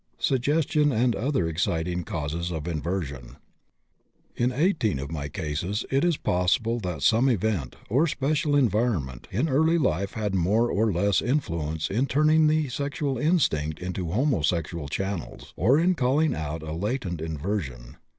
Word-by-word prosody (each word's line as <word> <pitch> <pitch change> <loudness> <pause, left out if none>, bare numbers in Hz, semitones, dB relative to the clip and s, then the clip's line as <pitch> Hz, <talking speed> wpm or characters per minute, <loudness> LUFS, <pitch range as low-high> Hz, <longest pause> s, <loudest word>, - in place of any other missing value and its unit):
SUGGESTION 145 +3 +2
AND 120 0 +2
OTHER 130 - 0
EXCITING 85 +1 -1
CAUSES 80 +2 -3
OF 80 -1 -4
INVERSION. 80 -6 -4 1.0
In 125 +1 +1
18 130 - +1
of 70 +3 -6
my 70 -3 -4
cases 80 +8 -3
it 135 +1 +2
is 175 -4 +2
possible 110 +7 +1
that 90 -9 -4
some 115 - +4
event, 105 - -1
or 140 +10 +2
special 145 0 0
environment, 105 - 0
in 125 - 0
early 160 +4 +3
life 100 - 0
had 105 -3 -2
more 100 +6 +2
or 110 +1 +2
less 100 +3 +2
influence 80 - -1
in 120 +7 +1
turning 155 +3 +4
the 155 -1 +2
sexual 140 0 -2
instinct 100 - +1
into 90 -1 -4
homosexual 85 - 0
channels, 95 +3 -5
or 120 - +3
in 175 +3 +3
calling 145 +1 +2
out 80 0 -4
a 80 0 -5
latent 95 - -3
inversion. 75 - -4
100 Hz, 145 wpm, -26 LUFS, 80-135 Hz, 1.0 s, some